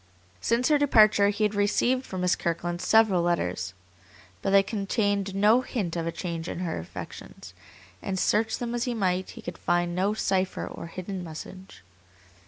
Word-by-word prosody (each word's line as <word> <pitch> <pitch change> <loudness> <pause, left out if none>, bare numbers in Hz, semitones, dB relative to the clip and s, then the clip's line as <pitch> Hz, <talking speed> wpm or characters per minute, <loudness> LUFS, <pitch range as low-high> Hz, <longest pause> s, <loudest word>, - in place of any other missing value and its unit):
Since 235 - +1
her 300 -1 +4
departure 215 -7 +5
he 205 +1 -1
had 210 0 +2
received 240 +6 +1
from 185 -1 -4
Miss 180 0 +2
Kirkland 175 +1 -2
several 210 -2 +4
letters, 90 - -1 0.7
but - - -1
they 195 0 +6
contained 200 -1 -1
no 210 +5 +5
hint 205 -10 -3
of 165 -1 -2
a - - -1
change 170 -2 -5
in 175 - -5
her 170 - -2
affections, 85 +1 -9 0.5
and 190 -1 -3
search 220 +4 +1
them 240 -1 -4
as 240 0 -1
he 245 -2 -2
might, 185 -3 0
he - - -9
could 175 - -7
find 175 0 0
no 195 +4 0
cipher 190 -3 0
or - - -8
hidden 185 +2 -6
message. 175 - -10
195 Hz, 175 wpm, -27 LUFS, 175-215 Hz, 0.7 s, they